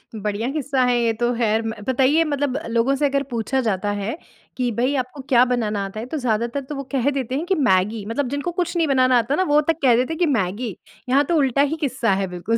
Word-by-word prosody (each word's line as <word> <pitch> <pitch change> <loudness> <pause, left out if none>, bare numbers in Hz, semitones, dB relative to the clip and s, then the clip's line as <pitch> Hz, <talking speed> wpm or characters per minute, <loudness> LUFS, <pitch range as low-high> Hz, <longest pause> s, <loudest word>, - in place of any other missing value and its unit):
बढ़िया 210 +2 -2
किस्सा 275 -3 0
है 245 -1 +2
ये 230 -1 +1
तो 240 +2 0
ख़ैर। 225 -1 +1 0.3
बताइए 265 +5 +3
मतलब 285 -3 -1
लोगों 235 +4 +2
से 290 +2 0
अगर 280 0 +1
पूछा 240 +3 -1
जाता 205 -3 -1
है 215 +9 -3 0.4
कि 250 -2 0
भई 250 +5 0
आपको 255 +1 -3
क्या 245 -3 +6
बनाना 215 -5 -1
आता 195 +2 -7
है? 225 - -5
तो 285 +5 -4
ज़्यादातर 235 +1 -1
तो 275 +2 -7
वो 275 - -4
कह 270 -1 +1
देते 265 -2 -3
हैं 305 +5 -2
कि 380 - +1
मैगी 200 +3 +1
मतलब 240 +5 -2
जिनको 285 +6 -3
कुछ 345 0 -3
नहीं 330 -2 +2
बनाना 255 -2 +4
आता 235 +3 0
है - - +1
ना 375 - +3
वो 300 - +6
तक 325 - -6
कह 250 -4 +5
देते 250 +6 0
हैं - - -6
कि 355 - +3
मैगी। 200 +3 -3 0.3
यहाँ 275 +3 +4
तो 340 - +2
उल्टा 275 -1 +2
ही - - -3
किस्सा 250 -6 0
है 195 0 -1
बिल्कुल। 180 +6 -2
250 Hz, 250 wpm, -22 LUFS, 225-280 Hz, 0.4 s, क्या